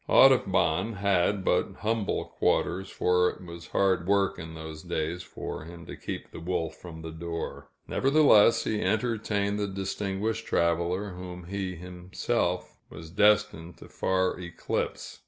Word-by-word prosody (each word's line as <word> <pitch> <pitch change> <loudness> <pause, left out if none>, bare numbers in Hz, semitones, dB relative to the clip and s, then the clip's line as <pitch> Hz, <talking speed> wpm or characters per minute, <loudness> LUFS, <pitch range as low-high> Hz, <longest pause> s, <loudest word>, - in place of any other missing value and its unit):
Audubon 90 +8 +5
had 100 -1 +1
but - - +2
humble 110 -1 0
quarters, 95 +1 0
for 90 0 +2
it 90 - -9
was 85 0 -9
hard 95 -3 +1
work 100 -2 +2
in 80 -1 -8
those 80 -1 -7
days 85 0 -2
for - - -7
him 85 0 -10
to - - -8
keep - - -6
the - - -8
wolf 85 -1 -2
from 80 -2 -10
the 80 - -6
door; 85 +1 -5 0.2
nevertheless, 135 -6 +5
he 105 -1 -1
entertained 105 -3 0
the 105 - 0
distinguished 100 +3 -3
traveler, 85 +4 +1
whom 90 0 -8
he 95 +1 -3
was 85 - -11
himself 90 +1 -2 0.4
destined 105 -6 +3
to - - -12
far 95 -1 0
eclipse. 85 -2 -4
90 Hz, 140 wpm, -28 LUFS, 85-100 Hz, 0.4 s, Audubon